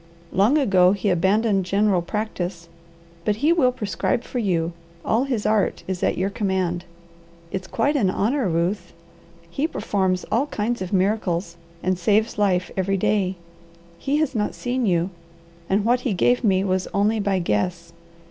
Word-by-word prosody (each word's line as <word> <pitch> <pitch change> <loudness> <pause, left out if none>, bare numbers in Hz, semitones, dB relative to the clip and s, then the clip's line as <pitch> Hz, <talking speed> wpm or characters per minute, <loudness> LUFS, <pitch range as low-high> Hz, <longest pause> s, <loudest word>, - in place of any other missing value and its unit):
Long 210 +10 +3
ago 190 -9 +4
he 200 0 0
abandoned 195 +3 +2
general 195 0 +2
practice, 180 -3 -4 0.6
but 210 - +1
he 295 +9 +3
will 270 -7 +3
prescribe 230 +1 -2
for 250 - -4
you; 175 -6 0 0.3
all 235 +5 +2
his 245 -6 -2
art 215 -1 +1
is 185 -1 -3
at - - +1
your 195 +2 0
command. 190 -4 -1 0.7
It's 190 0 -4
quite 285 +9 0
an 215 -9 +2
honour, 225 +4 0
Ruth. 175 +3 -1 0.6
He 285 - 0
performs 190 - -1
all 255 +6 +2
kinds 235 -2 -2
of 185 - -4
miracles, 185 -3 0 0.3
and 185 0 0
saves 210 +4 +1
life 185 -3 +1
every 195 +1 0
day. 190 -1 +1 0.6
He 280 +2 0
had 305 -3 0
not 210 -3 -1
seen 245 -1 -1
you, 175 0 +1 0.6
and 200 +2 +1
what 245 +2 +3
he 245 -3 -1
gave 245 +7 +2
me 190 -3 +3
was 185 -1 0
only 210 +2 +2
by 200 -2 +1
guess. 170 - -1
200 Hz, 160 wpm, -23 LUFS, 185-225 Hz, 0.7 s, ago